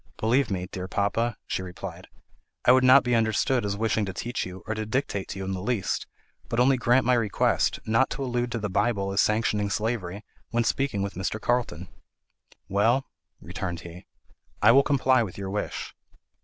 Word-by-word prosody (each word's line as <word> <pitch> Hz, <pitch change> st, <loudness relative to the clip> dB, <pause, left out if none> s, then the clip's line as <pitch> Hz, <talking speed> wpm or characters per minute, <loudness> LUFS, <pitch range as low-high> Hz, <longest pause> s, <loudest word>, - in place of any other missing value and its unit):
"Believe 125 Hz, +5 st, +2 dB
me, 90 Hz, -3 st, -2 dB
dear 90 Hz, 0 st, -6 dB
papa," 100 Hz, +4 st, 0 dB
she -, -, -2 dB
replied, 95 Hz, 0 st, -8 dB, 0.6 s
"I -, -, +7 dB
would 130 Hz, 0 st, +5 dB
not 130 Hz, +1 st, +7 dB
be 125 Hz, -, 0 dB
understood 115 Hz, +2 st, +2 dB
as 100 Hz, -1 st, -2 dB
wishing 110 Hz, 0 st, +1 dB
to 95 Hz, -, -5 dB
teach 120 Hz, -2 st, -3 dB
you, 90 Hz, +1 st, -10 dB
or 110 Hz, -, -2 dB
to 110 Hz, 0 st, -3 dB
dictate 110 Hz, -3 st, -2 dB
to -, -, -6 dB
you 95 Hz, -, -4 dB
in 95 Hz, -, -3 dB
the 95 Hz, -1 st, -3 dB
least; 100 Hz, -4 st, -1 dB, 0.4 s
but 115 Hz, -, -1 dB
only 130 Hz, +2 st, +5 dB
grant 125 Hz, 0 st, +3 dB
my 125 Hz, -, +4 dB
request, 115 Hz, -4 st, +1 dB
not 115 Hz, +4 st, +2 dB
to 140 Hz, -, -4 dB
allude 120 Hz, -1 st, -1 dB
to -, -, -1 dB
the 105 Hz, -2 st, -2 dB
Bible 100 Hz, 0 st, 0 dB
as 95 Hz, -, +3 dB
sanctioning 105 Hz, -1 st, +1 dB
slavery, 105 Hz, -2 st, -2 dB, 0.3 s
when 120 Hz, 0 st, +1 dB
speaking 115 Hz, -4 st, 0 dB
with 100 Hz, -, -4 dB
Mr. 95 Hz, +4 st, -3 dB
Carlton." 115 Hz, -8 st, -1 dB, 0.8 s
"Well," 115 Hz, +7 st, +2 dB, 0.3 s
returned 90 Hz, -2 st, -5 dB
he, 85 Hz, +1 st, -11 dB, 0.5 s
"I 105 Hz, +3 st, +6 dB
will 135 Hz, +3 st, +7 dB
comply 130 Hz, -3 st, +3 dB
with 105 Hz, -6 st, -4 dB
your 95 Hz, -1 st, -5 dB
wish." 105 Hz, 0 st, -4 dB
110 Hz, 190 wpm, -26 LUFS, 95-120 Hz, 0.8 s, I